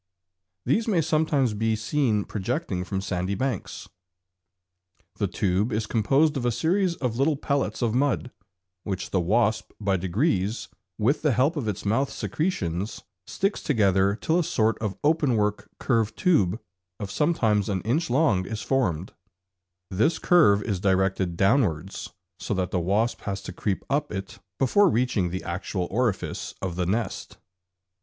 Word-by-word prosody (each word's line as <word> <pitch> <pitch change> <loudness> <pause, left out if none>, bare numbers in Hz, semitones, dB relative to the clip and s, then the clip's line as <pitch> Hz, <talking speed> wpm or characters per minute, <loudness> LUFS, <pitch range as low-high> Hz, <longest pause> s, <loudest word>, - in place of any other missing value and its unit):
These 220 - +1
may 195 -6 +2
sometimes 155 -6 +1
be 110 +1 0
seen 110 -2 0
projecting 95 -2 -2
from 95 +1 -3
sandy 95 0 -2
banks. 130 -2 -3 1.3
The - - 0
tube 100 +4 0
is 110 0 -1
composed 135 +9 +2
of 130 - -3
a 120 - +2
series 170 - +1
of 125 -6 -2
little 145 +3 +3
pellets 140 -3 -1
of 115 -2 +1
mud, 130 -1 0 0.5
which 95 -2 -4
the 95 - +2
wasp 110 +5 +1
by 100 -2 +1
degrees, 95 - 0 0.3
with 120 +8 +1
the 150 -4 +2
help 135 +8 +2
of 140 -8 -3
its 105 -1 -3
mouth 130 +7 +1
secretions, 100 - -3 0.2
sticks 195 +1 -1
together 100 -6 +2
till 160 +9 +1
a - - +2
sort 110 -6 +1
of 105 -3 -3
openwork 125 -10 +1
curved 115 -4 0
tube 110 - +2 0.4
of 100 -3 -5
sometimes 110 - +1
an 95 -3 -1
inch 140 - 0
long 120 - +2
is 110 -1 -4
formed 95 - 0
(fig. - - -30 0.8
5). 95 - -5
This 155 +9 +3
curve 105 - +4
is 100 -5 -2
directed 95 -2 +1
downwards, 95 - +1 0.3
so 105 - -2
that 90 -2 -1
the 90 - +1
wasp 100 +7 0
has 100 -1 -2
to 90 - -7
creep 95 +1 -2
up 145 +1 -1
it 95 -2 -6 0.2
before 190 +10 +4
reaching 120 - +1
the 95 +2 -4
actual 90 +1 -3
orifice 115 -1 -1
of 90 -3 -4
the 90 -1 -1
nest. 105 +2 -3
110 Hz, 155 wpm, -25 LUFS, 95-135 Hz, 1.3 s, curve